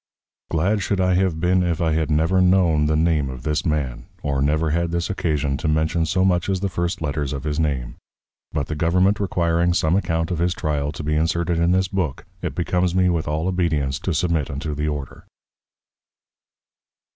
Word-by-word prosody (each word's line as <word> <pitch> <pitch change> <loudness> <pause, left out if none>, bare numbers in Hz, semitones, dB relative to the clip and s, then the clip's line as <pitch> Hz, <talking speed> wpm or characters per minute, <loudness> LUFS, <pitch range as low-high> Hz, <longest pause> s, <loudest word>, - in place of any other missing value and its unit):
Glad 95 +6 +1
should 95 +1 -1
I 95 0 +3
have 90 -3 +1
been, 90 +2 +2
if 85 -2 0
I 80 -2 +1
had 80 0 0
never 80 +5 +2
known 90 -5 +3
the 75 - +1
Name 80 -3 +1
of 65 -2 -8
this 75 0 0
Man; 75 -7 -2 0.2
or 70 -2 0
never 75 +2 +1
had 85 +1 0
this 85 +4 -2
occasion 75 -7 -1
to - - -3
mention 80 +2 +1
so 95 +3 +2
much 90 -1 +1
as 95 -1 0
the 100 - 0
first 85 -2 -2
Letters 75 -1 -2
of 70 - -5
his 75 0 -2
Name. 70 -6 -2 0.5
But 75 -2 -1
the 75 - -5
Government 90 +6 +2
requiring 85 -3 +1
some 80 +1 +2
Account 80 -4 0
of 85 - -2
his 90 +1 +1
Trial 75 -1 -1
to 75 - -7
be 75 +1 -1
inserted 85 +2 0
in 85 +1 +2
this 95 +1 +2
Book, 90 -8 -3 0.2
it - - -4
becomes 90 +1 0
me 90 -1 +3
with 85 -3 -1
all 80 +3 -1
Obedience 80 -7 0
to 95 - -2
submit 85 -3 0
unto 70 +2 -4
the 75 +1 -2
Order. 75 -3 -5
80 Hz, 200 wpm, -22 LUFS, 75-90 Hz, 0.5 s, I